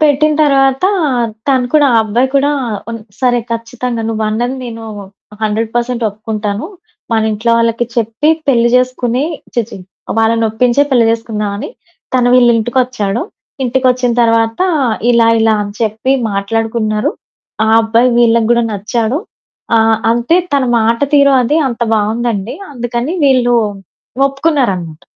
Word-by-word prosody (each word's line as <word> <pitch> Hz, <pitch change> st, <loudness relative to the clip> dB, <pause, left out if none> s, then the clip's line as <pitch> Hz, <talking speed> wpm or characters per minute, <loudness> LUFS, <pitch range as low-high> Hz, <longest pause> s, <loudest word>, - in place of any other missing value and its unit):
పెట్టిన 305 Hz, 0 st, +3 dB
తర్వాత 270 Hz, +2 st, +2 dB, 0.6 s
తను 260 Hz, -2 st, +2 dB
కూడా, 300 Hz, -2 st, +4 dB
ఆ -, -, +5 dB
అబ్బాయి 235 Hz, +5 st, 0 dB
కూడా 280 Hz, +1 st, +2 dB, 0.4 s
ఉన్ 230 Hz, -, -5 dB, 0.2 s
సరే, 245 Hz, -1 st, +2 dB
ఖచ్చితంగా 230 Hz, +1 st, -4 dB
నువ్వన్నది 220 Hz, +3 st, -1 dB
నేను 225 Hz, -1 st, -7 dB, 0.6 s
100% 230 Hz, +3 st, -1 dB
ఒప్పుకుంటాను. 210 Hz, 0 st, -4 dB, 0.5 s
మన 220 Hz, -1 st, +2 dB
ఇంట్లో 220 Hz, +3 st, -1 dB
వాళ్ళకి 230 Hz, +1 st, +1 dB
చెప్పి 230 Hz, +6 st, 0 dB, 0.2 s
పెళ్లి 235 Hz, -3 st, +3 dB
చేసుకుని 250 Hz, +1 st, 0 dB, 0.3 s
ఛీ! 240 Hz, -, +2 dB
ఛీ! -, -, -8 dB, 0.4 s
వాళ్ళనొప్పించే 230 Hz, +3 st, +2 dB
పెళ్లి 240 Hz, -4 st, +3 dB
చేసుకుందామని 215 Hz, -3 st, -3 dB, 0.5 s
తను 245 Hz, -1 st, +3 dB
వీళ్లింటికొచ్చాడు. 240 Hz, -2 st, +1 dB, 0.4 s
ఇంటికొచ్చిన 255 Hz, -1 st, +1 dB
తర్వాత 230 Hz, +1 st, +1 dB, 0.5 s
ఇలా 235 Hz, -1 st, +4 dB
ఇలా 220 Hz, 0 st, +3 dB
అని 205 Hz, 0 st, -6 dB
చెప్పి 220 Hz, +4 st, 0 dB, 0.2 s
మాట్లాడుకున్నారు. 215 Hz, +1 st, -1 dB, 0.5 s
ఆ -, -, 0 dB
అబ్బాయి 230 Hz, +3 st, +2 dB
వీళ్ళకి 230 Hz, -1 st, +3 dB
గడా 235 Hz, 0 st, +3 dB
నచ్చాడు. 225 Hz, +5 st, -1 dB, 0.6 s
ఆహ్, 225 Hz, 0 st, +3 dB
అంటే 240 Hz, +8 st, +2 dB, 0.2 s
తన 275 Hz, -2 st, +2 dB
మాట 230 Hz, +1 st, +1 dB
తీరు 280 Hz, -1 st, +5 dB
అది 290 Hz, +6 st, +1 dB
అంత 240 Hz, -1 st, -3 dB
బావుందండి. 220 Hz, 0 st, -1 dB, 0.2 s
అందుకని 240 Hz, +2 st, -3 dB
వీళ్ళు 255 Hz, -3 st, +3 dB, 0.7 s
ఒప్పుకున్నారనమాట. 250 Hz, -, -1 dB
235 Hz, 120 wpm, -14 LUFS, 220-255 Hz, 0.7 s, ఆ